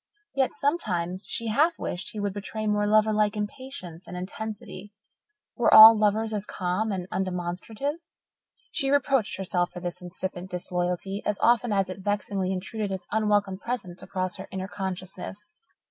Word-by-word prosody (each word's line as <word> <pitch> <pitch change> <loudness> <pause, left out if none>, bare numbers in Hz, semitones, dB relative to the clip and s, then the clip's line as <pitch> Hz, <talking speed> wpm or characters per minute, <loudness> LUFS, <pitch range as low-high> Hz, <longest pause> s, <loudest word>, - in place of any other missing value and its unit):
Yet 265 -2 +2
sometimes 190 - -1
she 230 -1 -1
half 305 +10 +3
wished 175 - -4
he 215 - -6
would 205 -1 -1
betray 210 +2 -5
more 210 -1 +2
lover 215 +1 +4
like 210 0 +2
impatience 205 -6 -6
and 180 - -6
intensity. 205 +1 -6 0.6
Were - - +3
all 220 +1 +12
lovers 215 +1 +1
as 205 -2 -2
calm 185 +4 -1
and 185 -2 -3
undemonstrative? 190 - -3 0.7
She 275 -5 0
reproached 275 -7 +2
herself 180 -2 0
for 180 - -8
this 175 0 -5
incipient 180 +1 -6
disloyalty 180 +2 -2
as 210 - 0
often 240 -1 +3
as 195 -2 +2
it 185 +1 -7
vexingly 200 -1 -1
intruded 200 +2 -3
its 190 -1 -4
unwelcome 205 -3 +1
presence 200 -8 -5
across 185 -1 -3
her 190 - -8
inner 190 0 -4
consciousness. 190 - -6
200 Hz, 155 wpm, -27 LUFS, 185-220 Hz, 0.7 s, all